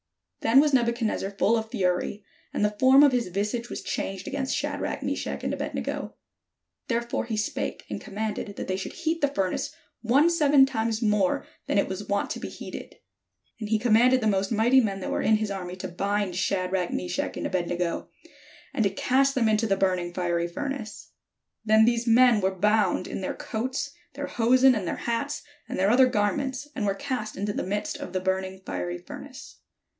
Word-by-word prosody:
Then 230 +4 +5
was 295 0 +3
Nebuchadnezzar 235 -5 +1
full 200 +3 +2
of 220 -1 -2
fury, 195 -2 -1 0.3
and 210 - +1
the 210 0 -1
form 265 +2 +7
of 285 - +6
his 245 -4 0
visage 210 +6 -2
was - - -6
changed 195 -1 -4
against 270 -1 -1
Shadrach, - - -3
Meshach, - - -3
and - - -1
Abed - - -4
nego: - - -4 0.7
therefore 235 0 -1
he 225 -2 -3
spake, 210 - -3
and - - -5
commanded 210 -1 -4
that - - -5
they 185 - 0
should 190 - -5
heat 330 +1 -2
the 285 - +4
furnace 195 -1 -1 0.3
one 275 +9 +4
seven 290 -4 +5
times 225 -3 -1
more 210 -3 +2 0.2
than - - +1
it 200 - +3
was 190 +2 -5
wont 200 0 0
to - - -3
be - - -5
heated. - - -8 0.6
And 215 -2 -5
he 220 - +3
commanded 245 +3 +4
the 225 - -3
most 195 -1 +1
mighty 235 +4 +5
men 200 -4 -2
that - - -3
were - - 0
in 220 - +4
his 215 -1 -1
army 180 -2 -5
to 185 - -5
bind 200 +1 -1
Sha 190 0 0
drach, 180 -1 -1
Meshach, 90 0 -3
and - - -3
Abed 180 -2 -1
nego, 175 -1 -2 0.6
and 220 - +1
to 200 - +3
cast 270 +7 +2
them 240 -4 +3
into 215 +1 +2
the 195 -2 +1
burning 185 -2 0
fiery 175 -1 -1
furnace. 270 +3 -6 0.5
Then 220 0 +5
these 235 0 +1
men 235 -1 +6
were 190 - +2
bound 210 -1 +2
in - - -5
their 185 - -3
coats, 260 +5 -3 0.2
their 285 +1 -3
hosen, 255 0 +4
and 205 -6 -2
their - - -1
hats, 235 +5 -2 0.3
and - - -3
their 195 +3 +3
other 255 +2 +6
garments, 260 +5 -1
and 205 - -1
were 195 - +1
cast 245 -3 -4
into 205 +1 -2
the - - -2
midst 205 +3 -2
of - - -7
the 185 - 0
burning 190 0 -2
fiery 90 -1 -3
furnace. 90 - -11
215 Hz, 200 wpm, -26 LUFS, 190-250 Hz, 0.7 s, form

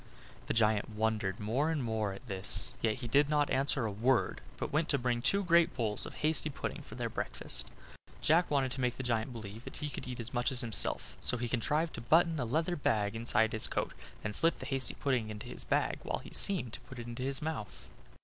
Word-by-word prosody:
The - - 0
giant 110 -2 +3
wondered 105 -3 0
more 125 +9 +1
and 155 -5 0
more 110 -3 0
at 100 +7 -10
this; 95 -3 -2
yet 110 -2 +2
he 125 0 -6
did 140 +5 +4
not 150 -1 +2
answer 135 -2 +2
a 110 - -1
word, 120 +5 +2 0.2
but - - -3
went 155 +2 +2
to 140 - +3
bring 120 -2 0
two 195 +11 +2
great 170 -2 +4
bowls 110 -4 -1
of - - -9
hasty 155 0 +2
pudding 140 - -4
for - - -11
their - - -2
breakfast. - - -3 0.5
Jack 170 +3 +4
wanted 135 -3 +2
to 135 - -4
make 125 -1 0
the 135 - -3
giant 115 0 0
believe 110 -1 -8
that - - -8
he 150 -1 -4
could - - -6
eat 125 -1 -5
as 115 +2 -2
much 120 0 +1
as 130 - +3
himself, 115 -4 +1
so 125 - +2
he 120 0 -2
contrived 150 +7 0
to - - -6
button 165 +5 +4
a 125 - 0
leathern 160 +8 0
bag 105 -2 +1
inside 110 -1 +2
his 110 - -1
coat, - - -2 0.3
and 110 - -2
slip 165 +9 +4
the - - -7
hasty 135 -1 0
pudding 125 -6 0
into 105 -1 -7
this - - -6
bag, - - +1
while - - -2
he - - -11
seemed 175 - +1
to - - -4
put 130 - -11
it 120 - -5
into 120 +1 -6
his 135 +1 0
mouth. 155 -9 -5
125 Hz, 235 wpm, -33 LUFS, 110-145 Hz, 0.5 s, did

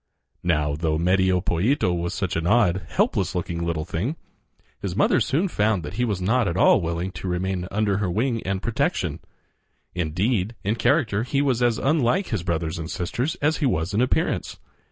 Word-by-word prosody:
Now, 75 -4 +1
though 80 0 0
Medio 90 +2 +2
Pollito 90 - +1
was 85 0 -2
such 95 -3 -2
an 80 +1 -1
odd, 95 -4 +2
helpless - - 0
looking 85 -1 -2
little 85 -2 -2
thing, 105 - -2 0.7
his - - -3
mother - - +3
soon 165 +8 +1
found 105 - +1
that 75 - -6
he 120 +5 0
was 105 -5 -1
not 110 +5 +2
at 85 0 -1
all 95 - +5
willing 85 +2 -2
to 90 +1 -7
remain 90 0 -2
under 100 -1 0
her 100 -2 -1
wing 115 +5 0
and 95 0 -3
protection. 115 - -1 0.7
Indeed, 95 +6 -1
in 105 - +1
character 115 -4 +1
he 130 +4 -1
was 130 -4 +1
as 120 -2 +3
unlike 150 +6 +1
his - - -1
brothers 85 -1 -2
and 80 +1 -5
sisters 125 - -2
as 155 +2 +2
he 145 - +1
was 80 -4 -1
in 105 - +2
appearance. 125 - 0
95 Hz, 185 wpm, -24 LUFS, 85-120 Hz, 0.7 s, all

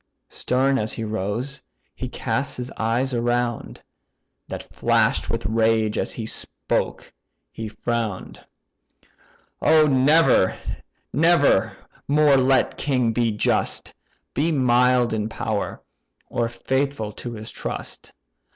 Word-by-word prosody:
Stern 135 +2 +1
as 110 0 -1
he 115 - -4
rose, 110 +6 -3 0.3
he 130 - -6
cast 130 +3 -2
his 125 +1 -5
eyes 120 +4 -1
around, 120 0 -1 0.6
That - - -6
flash'd - - +2
with - - -2
rage; 110 0 +2
and - - 0
as 110 -2 -6
spoke, - - -3 0.4
he 110 - -6
frown'd, 115 -3 -4 1.2
"O 155 0 +5
never, 135 - +4 0.6
never 155 - +3 0.3
more 150 0 +5
let 130 0 +2
king 125 -5 +1
be 120 0 +1
just, 105 -1 0 0.4
Be 160 +4 +1
mild 125 -3 +3
in 110 0 -1
power, 110 -2 -3 0.5
or 115 -1 0
faithful 130 -2 -2
to 120 +2 -7
his 110 -1 -8
trust! - - -7
120 Hz, 115 wpm, -23 LUFS, 110-135 Hz, 1.2 s, O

